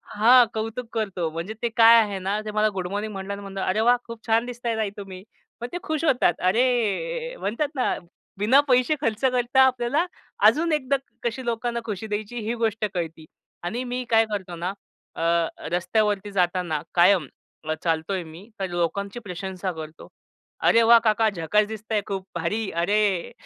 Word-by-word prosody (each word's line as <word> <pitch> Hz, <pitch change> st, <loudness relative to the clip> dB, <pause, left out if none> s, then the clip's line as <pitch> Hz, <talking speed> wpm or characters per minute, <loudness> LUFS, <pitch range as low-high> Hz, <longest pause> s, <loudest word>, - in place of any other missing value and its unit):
हां, 240 Hz, +4 st, +7 dB
कौतुक 225 Hz, +2 st, -4 dB
करतो. 195 Hz, -7 st, -2 dB
म्हणजे 170 Hz, +6 st, -5 dB
ते 235 Hz, -, +2 dB
काय 230 Hz, 0 st, +8 dB
आहे 205 Hz, -3 st, -2 dB
ना, 195 Hz, +3 st, -1 dB
त्या 215 Hz, -1 st, -6 dB
मला 215 Hz, 0 st, +3 dB
गुड 185 Hz, -2 st, -3 dB
मॉर्निंग 205 Hz, +3 st, -3 dB
म्हणाल्या 195 Hz, +1 st, -5 dB
आणि 200 Hz, -, -9 dB
म्हणलं, 195 Hz, -1 st, -6 dB
"अरे 190 Hz, +4 st, +1 dB
वाह, 245 Hz, +2 st, +5 dB
खूप 230 Hz, -1 st, -10 dB
छान 225 Hz, +1 st, +3 dB
दिसताय 240 Hz, -1 st, -3 dB
ताई 215 Hz, -2 st, 0 dB
तुम्ही." 190 Hz, -2 st, -9 dB, 0.4 s
मग 240 Hz, -, -3 dB
त्या 355 Hz, -, -4 dB
खुश 315 Hz, -3 st, -2 dB
होतात. 250 Hz, -, +3 dB
अरे! 250 Hz, -, 0 dB
म्हणतात 235 Hz, +9 st, -1 dB
ना, 255 Hz, -, +1 dB, 0.4 s
बिना 225 Hz, +7 st, +5 dB
पैसे 255 Hz, +4 st, +4 dB
खर्च 225 Hz, -6 st, -1 dB
करता 250 Hz, 0 st, +3 dB
आपल्याला 260 Hz, +5 st, +2 dB, 0.4 s
अजून 330 Hz, +2 st, 0 dB
एकदा 280 Hz, -2 st, +1 dB, 0.3 s
कशी 240 Hz, +2 st, -3 dB
लोकांना 235 Hz, 0 st, -1 dB
खुशी 215 Hz, 0 st, -4 dB
द्यायची 215 Hz, +3 st, -4 dB
ही 230 Hz, -, 0 dB
गोष्ट 225 Hz, -2 st, 0 dB
कळते 165 Hz, -3 st, -4 dB, 0.4 s
आणि 225 Hz, +9 st, -3 dB
मी 250 Hz, 0 st, -3 dB
काय 225 Hz, -1 st, +5 dB
करतो 190 Hz, -4 st, -4 dB
ना, 175 Hz, +3 st, -3 dB, 0.4 s
अ, -, -, -5 dB, 0.5 s
रस्त्यावरती 205 Hz, +3 st, 0 dB
जाताना 180 Hz, -4 st, 0 dB
कायम 175 Hz, -3 st, +5 dB, 0.4 s
अ, -, -, +2 dB
चालतो 165 Hz, +2 st, 0 dB
आहे 185 Hz, -2 st, -2 dB
मी 165 Hz, +6 st, -13 dB
तर 190 Hz, -, -1 dB
लोकांची 195 Hz, +5 st, -2 dB
प्रशंसा 190 Hz, -2 st, -5 dB
करतो. 155 Hz, -1 st, -9 dB, 0.5 s
"अरे 230 Hz, -, +4 dB
वाह! 230 Hz, +1 st, +7 dB
काका 220 Hz, 0 st, +3 dB
झकास 205 Hz, +3 st, +1 dB
दिसताय 220 Hz, 0 st, -3 dB
खूप 195 Hz, -2 st, -4 dB
भारी, 215 Hz, -1 st, -1 dB
अरे!" 200 Hz, -1 st, +1 dB
215 Hz, 175 wpm, -24 LUFS, 190-240 Hz, 0.5 s, काय